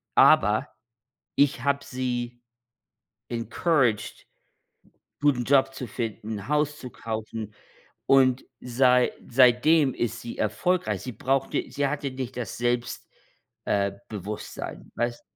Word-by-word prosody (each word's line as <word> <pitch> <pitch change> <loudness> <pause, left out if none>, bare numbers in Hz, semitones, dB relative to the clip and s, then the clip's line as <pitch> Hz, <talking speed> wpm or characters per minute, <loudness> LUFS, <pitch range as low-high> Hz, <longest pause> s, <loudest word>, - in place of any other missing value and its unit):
aber - - +5 0.7
ich 140 -3 +3
habe 140 0 +1
sie 120 -1 -3 0.9
encouraged, 120 0 0 0.8
'n - - -57
guten 135 -4 +3
Job 135 -1 +4
zu 130 - -5
finden, 110 -2 -5
Haus 150 0 +1
zu 125 - -7
kaufen. 110 -2 -5 0.5
Und 130 -1 +4 0.2
sei 125 0 +3 0.2
seitdem 130 +4 +5
ist 115 0 -2
sie 120 - -7
erfolgreich. 110 - 0
Sie 125 - -5
brauchte 135 +5 -1
sie 145 - 0
hatte 140 -1 -3
nicht 130 -2 -6
das 120 -5 -4
Selbst 120 0 -1 0.6
äh, 100 -1 +1 0.2
Bewusstsein, 105 0 -6
weißt 120 0 -2
125 Hz, 115 wpm, -26 LUFS, 115-135 Hz, 0.9 s, aber